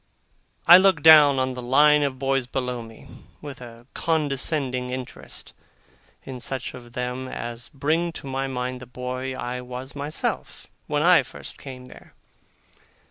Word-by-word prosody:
I 175 Hz, +2 st, +10 dB
look 190 Hz, -6 st, +3 dB
down 150 Hz, -3 st, +8 dB
on 130 Hz, 0 st, 0 dB
the 125 Hz, -, -6 dB
line 150 Hz, +4 st, +5 dB
of 140 Hz, -2 st, -1 dB
boys 135 Hz, -1 st, 0 dB
below 125 Hz, -2 st, -3 dB
me, 115 Hz, -1 st, -13 dB, 0.3 s
with 140 Hz, -3 st, -9 dB
a 120 Hz, -1 st, -12 dB
condescending 140 Hz, -4 st, -1 dB
interest 130 Hz, 0 st, -8 dB, 0.7 s
in 130 Hz, -2 st, -8 dB
such 130 Hz, +1 st, -5 dB
of 120 Hz, -1 st, -12 dB
them 125 Hz, +1 st, -4 dB
as 120 Hz, -1 st, -6 dB
bring 160 Hz, +5 st, 0 dB
to -, -, -9 dB
my 135 Hz, 0 st, -2 dB
mind 125 Hz, -1 st, -4 dB
the 125 Hz, -, -10 dB
boy 130 Hz, +1 st, -5 dB
I 125 Hz, 0 st, -4 dB
was 125 Hz, +2 st, -8 dB
myself, 145 Hz, +2 st, -3 dB, 0.2 s
when 150 Hz, 0 st, 0 dB
I 180 Hz, 0 st, +6 dB
first -, -, -10 dB
came 130 Hz, -2 st, -9 dB
there. 125 Hz, -, -16 dB
130 Hz, 150 wpm, -24 LUFS, 125-145 Hz, 0.7 s, I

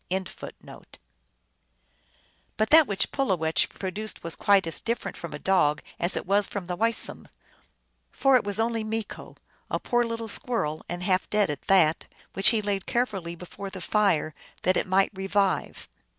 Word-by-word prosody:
1 190 Hz, +1 st, -1 dB, 2.3 s
But 215 Hz, 0 st, 0 dB
that 315 Hz, -2 st, +7 dB
which 200 Hz, -2 st, 0 dB
Pulowech 180 Hz, -, 0 dB
produced 205 Hz, +3 st, -5 dB
was 165 Hz, -1 st, -2 dB
quite 200 Hz, -2 st, +3 dB
as 165 Hz, -, +2 dB
different 230 Hz, -5 st, -3 dB
from 170 Hz, -, -8 dB
a 150 Hz, -, -5 dB
dog 150 Hz, -4 st, +1 dB, 0.2 s
as 175 Hz, -, +1 dB
was 200 Hz, +2 st, +2 dB
the 180 Hz, -3 st, -5 dB
Weisum; 230 Hz, +4 st, +2 dB, 0.8 s
for 270 Hz, -1 st, +3 dB
it 250 Hz, -, +4 dB
was 205 Hz, +1 st, -3 dB
only 225 Hz, 0 st, 0 dB
Meeko, 220 Hz, 0 st, -6 dB, 0.3 s
a -, -, -1 dB
poor 240 Hz, 0 st, +1 dB
little 230 Hz, -1 st, -4 dB
squirrel, 180 Hz, -10 st, -2 dB
and 175 Hz, +1 st, -4 dB
half 185 Hz, 0 st, 0 dB
dead 210 Hz, -6 st, +2 dB
at 145 Hz, -, -6 dB
that, 165 Hz, -5 st, +3 dB, 0.3 s
which 195 Hz, -, +6 dB
he 220 Hz, -2 st, 0 dB
laid 200 Hz, -2 st, -2 dB
carefully 200 Hz, -9 st, -2 dB
before 180 Hz, +3 st, -8 dB
the 190 Hz, -, -9 dB
fire 180 Hz, -5 st, +1 dB, 0.3 s
that 185 Hz, -, +2 dB
it -, -, 0 dB
might 190 Hz, +1 st, +2 dB
revive. 195 Hz, 0 st, -1 dB
195 Hz, 155 wpm, -26 LUFS, 180-220 Hz, 2.3 s, that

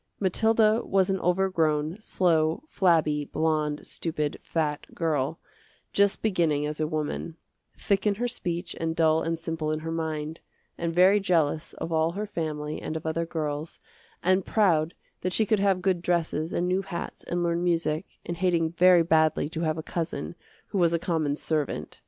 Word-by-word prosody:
Mathilda 220 Hz, +3 st, +3 dB
was 195 Hz, -1 st, +2 dB
an 190 Hz, -, 0 dB
overgrown, 175 Hz, -3 st, +1 dB
slow, 165 Hz, -, +1 dB
flabby, 160 Hz, -, +2 dB
blonde, 155 Hz, -1 st, -1 dB
stupid, 155 Hz, -3 st, -2 dB
fat 150 Hz, -2 st, -2 dB
girl, 155 Hz, -2 st, 0 dB, 0.6 s
just 200 Hz, 0 st, +2 dB
beginning 165 Hz, -8 st, +1 dB
as 150 Hz, +1 st, -3 dB
a 155 Hz, -, +1 dB
woman; 155 Hz, +1 st, -3 dB, 0.4 s
thick 200 Hz, +1 st, 0 dB
in 205 Hz, -, +2 dB
her 245 Hz, +4 st, -1 dB
speech 175 Hz, -7 st, -3 dB
and 160 Hz, 0 st, -1 dB
dull 160 Hz, -1 st, +3 dB
and 165 Hz, 0 st, -1 dB
simple 160 Hz, -1 st, -3 dB
in 155 Hz, 0 st, -2 dB
her 165 Hz, +1 st, -4 dB
mind, 160 Hz, -1 st, -3 dB, 0.3 s
and 170 Hz, -1 st, -2 dB
very 185 Hz, +4 st, +5 dB
jealous 165 Hz, -5 st, 0 dB
of 165 Hz, -, -6 dB
all 160 Hz, +1 st, +1 dB
her 205 Hz, +3 st, -3 dB
family 155 Hz, -5 st, -4 dB
and 160 Hz, -, -3 dB
of 160 Hz, -, -9 dB
other 165 Hz, +1 st, -1 dB
girls, 155 Hz, -1 st, -4 dB, 0.4 s
and 185 Hz, +2 st, +3 dB
proud 170 Hz, -7 st, +2 dB, 0.3 s
that 185 Hz, 0 st, -1 dB
she 220 Hz, +5 st, +3 dB
could 215 Hz, 0 st, +2 dB
have 195 Hz, -2 st, +2 dB
good 185 Hz, -3 st, +1 dB
dresses 165 Hz, -2 st, 0 dB
and 175 Hz, -, 0 dB
new 185 Hz, +1 st, +1 dB
hats 190 Hz, -3 st, -6 dB
and 175 Hz, 0 st, -1 dB
learn 170 Hz, 0 st, 0 dB
music, 165 Hz, -1 st, -1 dB
and 170 Hz, -, -4 dB
hating 170 Hz, -3 st, +1 dB
very 175 Hz, 0 st, +6 dB
badly 160 Hz, -2 st, +3 dB
to 160 Hz, 0 st, -4 dB
have 155 Hz, -1 st, 0 dB
a 160 Hz, -, -4 dB
cousin 170 Hz, +1 st, -4 dB, 0.4 s
who 200 Hz, -, -1 dB
was 170 Hz, -1 st, +3 dB
a -, -, +3 dB
common 160 Hz, -4 st, -1 dB
servant. 155 Hz, -1 st, -3 dB
165 Hz, 175 wpm, -27 LUFS, 155-185 Hz, 0.6 s, very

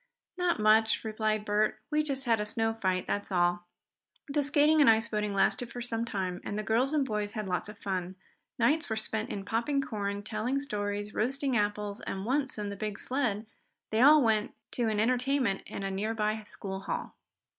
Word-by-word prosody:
"Not 355 Hz, -5 st, +1 dB
much," 220 Hz, +1 st, +4 dB
replied 215 Hz, -1 st, -1 dB
Bert. 210 Hz, +1 st, +1 dB
"We 300 Hz, 0 st, +3 dB
just 275 Hz, -3 st, -3 dB
had 230 Hz, -2 st, +3 dB
a 210 Hz, -, -1 dB
snow 225 Hz, +1 st, 0 dB
fight; 185 Hz, -4 st, -1 dB
that's 205 Hz, 0 st, -2 dB
all." 175 Hz, -1 st, +1 dB, 0.6 s
The 290 Hz, +1 st, +1 dB
skating 295 Hz, +2 st, +4 dB
and 280 Hz, -, +7 dB
ice 225 Hz, +1 st, +4 dB
boating 210 Hz, -2 st, -2 dB
lasted 235 Hz, +4 st, +1 dB
for 245 Hz, -, -6 dB
some 230 Hz, -1 st, -2 dB
time, 190 Hz, -5 st, -3 dB
and 205 Hz, -, -4 dB
the 215 Hz, -, -2 dB
girls 230 Hz, +6 st, +2 dB
and 300 Hz, -3 st, +2 dB
boys 210 Hz, -3 st, -2 dB
had 215 Hz, -2 st, -3 dB
lots 180 Hz, +1 st, -2 dB
of 210 Hz, -, -10 dB
fun. 185 Hz, -1 st, -3 dB, 0.4 s
Nights 290 Hz, +7 st, +2 dB
were 220 Hz, -, 0 dB
spent 220 Hz, 0 st, -3 dB
in 195 Hz, -1 st, -5 dB
popping 235 Hz, +6 st, 0 dB
corn, 205 Hz, -5 st, -3 dB
telling 225 Hz, +5 st, -1 dB
stories, 205 Hz, -5 st, -3 dB
roasting 270 Hz, +3 st, 0 dB
apples, 205 Hz, -1 st, -1 dB
and 195 Hz, 0 st, -4 dB
once, 265 Hz, +2 st, 0 dB
in 205 Hz, -1 st, -3 dB
the 200 Hz, -, -5 dB
big 210 Hz, 0 st, -4 dB
sled, 235 Hz, -5 st, -1 dB, 0.5 s
they 220 Hz, +1 st, +2 dB
all 295 Hz, +2 st, +8 dB
went 220 Hz, -2 st, +1 dB, 0.2 s
to 235 Hz, -3 st, 0 dB
an 215 Hz, -1 st, 0 dB
entertainment 250 Hz, -2 st, +1 dB
in 200 Hz, -, -6 dB
a 195 Hz, -, -2 dB
nearby 215 Hz, +2 st, -1 dB
school 195 Hz, -2 st, -6 dB
hall. -, -, -4 dB
215 Hz, 195 wpm, -30 LUFS, 205-250 Hz, 0.6 s, all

